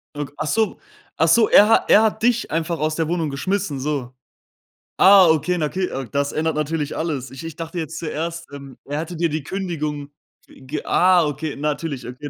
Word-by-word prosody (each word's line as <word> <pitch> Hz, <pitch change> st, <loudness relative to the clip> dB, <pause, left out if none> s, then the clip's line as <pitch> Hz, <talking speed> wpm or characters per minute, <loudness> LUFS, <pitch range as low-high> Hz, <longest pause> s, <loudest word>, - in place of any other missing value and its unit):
Ok 145 Hz, -1 st, -5 dB
Ach 155 Hz, -, -3 dB
so 220 Hz, +4 st, 0 dB, 0.4 s
ach 160 Hz, -, +3 dB
so, 220 Hz, +6 st, +5 dB
er 210 Hz, +2 st, +7 dB
hat 225 Hz, -, +3 dB
er 215 Hz, -, +7 dB
hat 220 Hz, 0 st, 0 dB
dich 240 Hz, -1 st, +1 dB
einfach 165 Hz, 0 st, -2 dB
aus 155 Hz, 0 st, -1 dB
der 165 Hz, -2 st, -1 dB
Wohnung 165 Hz, -2 st, -1 dB
geschmissen, 170 Hz, 0 st, -2 dB
so. 135 Hz, -3 st, -3 dB, 0.8 s
Ah, 195 Hz, -2 st, +7 dB
okay, 160 Hz, +3 st, +2 dB
na, 155 Hz, -, 0 dB
okay, 185 Hz, +4 st, -2 dB, 0.2 s
das 140 Hz, 0 st, 0 dB
ändert 160 Hz, 0 st, -1 dB
natürlich 150 Hz, 0 st, -2 dB
alles. 140 Hz, -6 st, -3 dB
Ich 135 Hz, -, -9 dB
ich 165 Hz, -1 st, -7 dB
dachte 165 Hz, +1 st, -6 dB
jetzt 160 Hz, -1 st, -4 dB
zuerst, 170 Hz, +1 st, -4 dB
ähm, 140 Hz, -2 st, -10 dB
er 145 Hz, +2 st, -3 dB
hatte 165 Hz, +1 st, -6 dB
dir 170 Hz, 0 st, +1 dB
die 155 Hz, -1 st, -3 dB
Kündigung 150 Hz, -5 st, -4 dB, 0.4 s
ge 135 Hz, +3 st, -7 dB
Ah, 180 Hz, -2 st, +4 dB
okay, 150 Hz, +1 st, -4 dB
natürlich, 145 Hz, -3 st, -3 dB
okay, 135 Hz, +4 st, -7 dB
160 Hz, 195 wpm, -21 LUFS, 145-175 Hz, 0.8 s, er